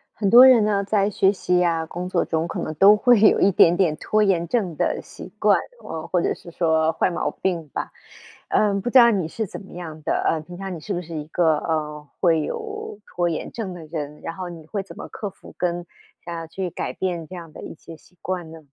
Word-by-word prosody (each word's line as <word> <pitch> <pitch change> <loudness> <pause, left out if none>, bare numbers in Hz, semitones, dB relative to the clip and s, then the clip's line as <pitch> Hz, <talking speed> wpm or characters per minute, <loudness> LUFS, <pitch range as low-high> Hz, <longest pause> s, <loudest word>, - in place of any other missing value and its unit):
很 200 -3 0
多 245 +4 +10
人 245 -5 +7
呢， 200 -1 +1
在 200 0 +1
学 195 -1 +3
习 180 -2 +1
啊， 165 -2 0
工 180 +3 -6
作 180 - +1
中 160 0 -1
可 - - -5
能 155 - -4
都 200 +6 +7
会 240 -1 +4
有 215 - +6
一 200 - +4
点 170 -1 +5
点 170 -5 +2
拖 215 +6 0
延 185 -5 +2
症 190 -8 0
的 - - 0
习 - - -12
惯， - - +5 0.3
嗯， 160 -1 -5
或 180 - +1
者 - - 0
是 170 - -12
说 160 -1 +2
坏 165 - +1
毛 170 - -2
病 170 -5 -3
吧。 - - -5 0.6
呃， 210 -1 +2
不 245 - -2
知 260 - +5
道 235 -1 +7
你 190 -7 0
是 220 +4 -3
怎 - - -8
么 195 - -14
样 160 -3 -8
的？ - - 0
呃， 160 - +1
平 175 +3 -11
常 190 -1 -5
你 - - -8
是 200 - -4
不 175 - -2
是 165 -1 -9
一 150 -1 -4
个， 160 -1 +2
呃， 150 -2 -3
会 165 -4 +3
有 430 - -6
拖 175 -1 -1
延 160 - -4
症 210 -6 -5
的 170 -3 -9
人， 150 -2 -6
然 165 - -6
后 185 -2 -5
你 165 -3 -10
会 200 +2 -3
怎 175 -3 -13
么 - - -7
克 205 - -6
服 - - -16
跟 175 -1 -2 0.4
想 170 0 -5
要 165 -1 -6
去 185 +3 -4
改 - - -4
变 175 -3 -3
这 185 - -9
样 165 -3 -10
的 - - -10
一 - - -8
些 165 +1 -12
习 180 +3 -23
惯 175 -3 -4
呢？ 165 - -10
175 Hz, 265 characters per minute, -23 LUFS, 160-195 Hz, 0.6 s, 多